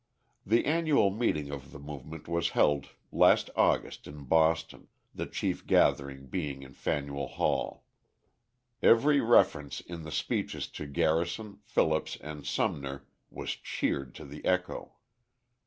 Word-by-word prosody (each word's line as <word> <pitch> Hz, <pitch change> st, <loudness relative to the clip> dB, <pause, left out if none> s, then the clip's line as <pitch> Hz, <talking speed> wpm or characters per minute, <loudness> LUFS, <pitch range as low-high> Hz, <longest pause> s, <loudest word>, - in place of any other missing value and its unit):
The 115 Hz, +4 st, +3 dB
annual 155 Hz, -9 st, +3 dB
meeting 75 Hz, -10 st, -1 dB
of 70 Hz, -1 st, -7 dB
the -, -, -9 dB
movement 75 Hz, +2 st, -9 dB
was 85 Hz, 0 st, 0 dB
held 75 Hz, -2 st, +3 dB, 0.2 s
last -, -, +4 dB
August -, -, +1 dB
in 70 Hz, 0 st, -9 dB
Boston, 80 Hz, +3 st, +1 dB, 0.3 s
the -, -, -4 dB
chief -, -, -3 dB
gathering 70 Hz, -1 st, +2 dB
being 70 Hz, -2 st, -4 dB
in 65 Hz, 0 st, -12 dB
Faneuil 70 Hz, -1 st, -2 dB
Hall. -, -, -1 dB, 1.0 s
Every 140 Hz, +5 st, +5 dB
reference 75 Hz, -10 st, +3 dB
in 85 Hz, -1 st, -8 dB
the 80 Hz, -, -8 dB
speeches 75 Hz, +1 st, -2 dB
to 75 Hz, -, -7 dB
Garrison, 85 Hz, +8 st, 0 dB
Phillips, 80 Hz, 0 st, +1 dB
and 75 Hz, -1 st, -8 dB
Sumner 70 Hz, -2 st, -2 dB, 0.2 s
was -, -, -5 dB
cheered 70 Hz, -3 st, -2 dB
to -, -, -9 dB
the 70 Hz, +2 st, -10 dB
echo. 90 Hz, 0 st, -1 dB
75 Hz, 130 wpm, -30 LUFS, 70-90 Hz, 1.0 s, Every